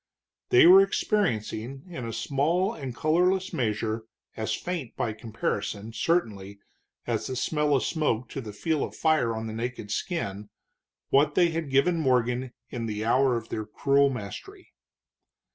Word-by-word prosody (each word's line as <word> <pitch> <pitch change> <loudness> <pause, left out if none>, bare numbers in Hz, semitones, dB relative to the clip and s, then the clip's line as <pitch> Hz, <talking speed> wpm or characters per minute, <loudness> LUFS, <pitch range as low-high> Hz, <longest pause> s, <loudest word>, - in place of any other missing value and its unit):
They 375 -1 +7
were 375 +3 +10
experiencing 135 - -1
in 130 -10 -6
a - - -4
small 150 - 0
and 135 -5 -6
colorless 180 +6 +1
measure, 110 -1 -1 0.3
as 110 -1 -2
faint 170 -9 -5
by 110 - -1
comparison, 110 -1 -4
certainly, 110 - -1 0.5
as - - -2
the 130 - -4
smell 150 +2 +1
of 130 - +1
smoke 135 -7 0
to 135 - -5
the 110 -4 -7
feel 155 +8 -1
of - - -6
fire 155 -8 +2
on 110 0 -4
the 110 - -5
naked 115 -2 -5
skin, 105 - -3 0.6
what 145 +2 +3
they 175 -2 +5
had 165 -2 -3
given 150 +6 +3
Morgan 125 -2 +1 0.2
in 115 -2 -3
the 105 0 -3
hour 125 +1 +3
of 115 0 -7
their 110 - -3
cruel 140 +5 +3
mastery. 135 - -8
130 Hz, 155 wpm, -27 LUFS, 110-160 Hz, 0.6 s, were